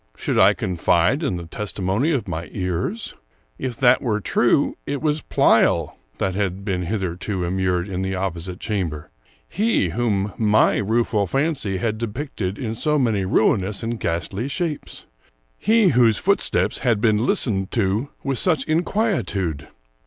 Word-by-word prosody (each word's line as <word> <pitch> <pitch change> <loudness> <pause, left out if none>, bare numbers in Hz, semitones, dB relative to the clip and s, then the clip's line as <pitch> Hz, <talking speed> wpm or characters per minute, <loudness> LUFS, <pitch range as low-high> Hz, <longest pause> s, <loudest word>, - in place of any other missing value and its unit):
Should - - 0
I - - +6
confide 90 - +1
in 135 - -1
the 85 - -7
testimony 105 - -1
of 135 -9 -1
my 85 -1 -5
ears? 95 - -3 0.5
If 125 -3 -4
that 125 -2 +4
were 110 -4 0
true, 120 +6 +2
it 140 0 -2
was 150 +1 0
Pleyel - - +3 0.2
that 95 - -1
had 100 0 -2
been 90 -4 -2
hitherto 95 -1 -2
immured 90 0 0
in 95 -2 -3
the 95 0 -2
opposite 90 -1 -4
chamber; 90 -9 -3 0.4
he 205 - +1
whom 105 0 -1
my 110 -1 +4
rueful 110 -1 +1
fancy 135 - -1
had 110 +2 -2
depicted 110 -4 -4
in 115 -5 -3
so 150 +6 0
many 110 -8 +1
ruinous 100 +2 +1
and 115 0 -3
ghastly 95 +8 -2
shapes; 155 0 -4 0.5
he 220 -3 +4
whose 120 -5 +4
footsteps - - +1
had 120 -5 +1
been 110 0 +2
listened 95 -6 +1
to 110 +4 0
with 135 -3 -1
such 160 -8 +1
inquietude! 155 - -1
105 Hz, 145 wpm, -22 LUFS, 95-130 Hz, 0.5 s, I